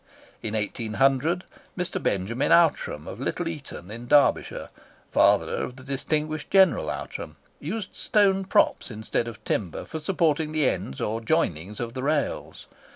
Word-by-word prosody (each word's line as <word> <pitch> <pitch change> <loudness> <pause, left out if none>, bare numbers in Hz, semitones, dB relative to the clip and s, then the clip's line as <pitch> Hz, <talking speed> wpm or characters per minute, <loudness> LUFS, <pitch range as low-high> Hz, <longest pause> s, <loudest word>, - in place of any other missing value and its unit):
In 110 0 -3
1800, 135 - +1 0.3
Mr. 180 -1 -2
Benjamin 100 +7 0
Outram, 155 - +3
of 100 - -7
Little 165 +6 -2
Eaton, 145 - -7
in 120 +2 -8
Derbyshire 145 +2 +3 0.4
(father - - +4
of 125 - -3
the 130 - -12
distinguished 150 +3 -2
General 190 -3 +4
Outram), - - -5 0.2
used 190 +6 -5
stone 195 -3 +2
props - - +2
instead 110 +1 -2
of 110 -2 -9
timber 90 -7 -2
for 160 - -5
supporting 155 -2 +1
the 155 -4 +3
ends 65 - -2
or 110 +2 -2
joinings 105 - 0
of 115 -1 -4
the 130 - -4
rails. 145 +1 -1
140 Hz, 145 wpm, -26 LUFS, 110-160 Hz, 0.4 s, father